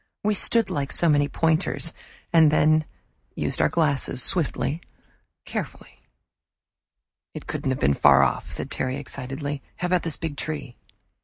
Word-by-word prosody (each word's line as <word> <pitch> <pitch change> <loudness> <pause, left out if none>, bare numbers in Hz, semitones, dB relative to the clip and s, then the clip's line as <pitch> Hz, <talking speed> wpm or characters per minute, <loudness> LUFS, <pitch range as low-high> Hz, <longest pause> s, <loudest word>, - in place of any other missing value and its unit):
We 210 +1 +2
stood 225 +2 +2
like 140 -2 -2
so 170 - +2
many 145 -2 +3
pointers, 165 +2 0 0.4
and 160 -2 +6
then 155 +1 +3 0.5
used - - -2
our - - +3
glasses, 145 -6 +1
swiftly, 165 -2 0 0.6
carefully. - - -7 1.4
"It - - -7
couldn't - - -3
have 130 - -1
been 70 +1 +3
far 70 0 +5
off," 65 - -1
said - - -2
Terry 130 +1 -2
excitedly. 140 +1 -5
"How 180 - -4
about 180 0 +1
this 165 -3 +1
big 160 -4 -5
tree?" 145 -5 -5
150 Hz, 145 wpm, -24 LUFS, 135-165 Hz, 1.4 s, and